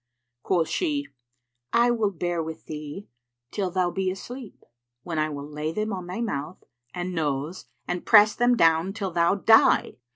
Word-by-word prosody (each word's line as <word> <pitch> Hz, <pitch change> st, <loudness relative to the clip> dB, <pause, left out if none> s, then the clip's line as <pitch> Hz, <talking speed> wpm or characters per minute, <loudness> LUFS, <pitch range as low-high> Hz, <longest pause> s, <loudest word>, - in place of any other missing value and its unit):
Quoth 170 Hz, 0 st, +1 dB
she, 290 Hz, -, -1 dB, 0.6 s
"I 240 Hz, +1 st, +4 dB
will 225 Hz, -3 st, +1 dB
bear 175 Hz, -2 st, -2 dB
with 160 Hz, 0 st, -7 dB
thee 150 Hz, +5 st, -7 dB, 0.4 s
till 195 Hz, -3 st, -2 dB
thou 180 Hz, 0 st, 0 dB
be 190 Hz, 0 st, -1 dB
asleep, 235 Hz, +5 st, -8 dB, 0.4 s
when 165 Hz, -3 st, -3 dB
I 155 Hz, 0 st, +1 dB
will 145 Hz, -1 st, -6 dB
lay 150 Hz, +1 st, -4 dB
them 215 Hz, +4 st, -2 dB
on 185 Hz, -2 st, -5 dB
thy 185 Hz, +6 st, -4 dB
mouth 165 Hz, -6 st, -4 dB, 0.3 s
and 180 Hz, +4 st, -4 dB
nose 150 Hz, +1 st, -2 dB, 0.2 s
and 180 Hz, 0 st, -3 dB
press 210 Hz, -1 st, +7 dB
them 245 Hz, 0 st, +2 dB
down 165 Hz, +2 st, +3 dB
till 200 Hz, -4 st, -4 dB
thou 170 Hz, +2 st, +2 dB
die." 225 Hz, +3 st, +4 dB
180 Hz, 165 wpm, -25 LUFS, 160-215 Hz, 0.6 s, press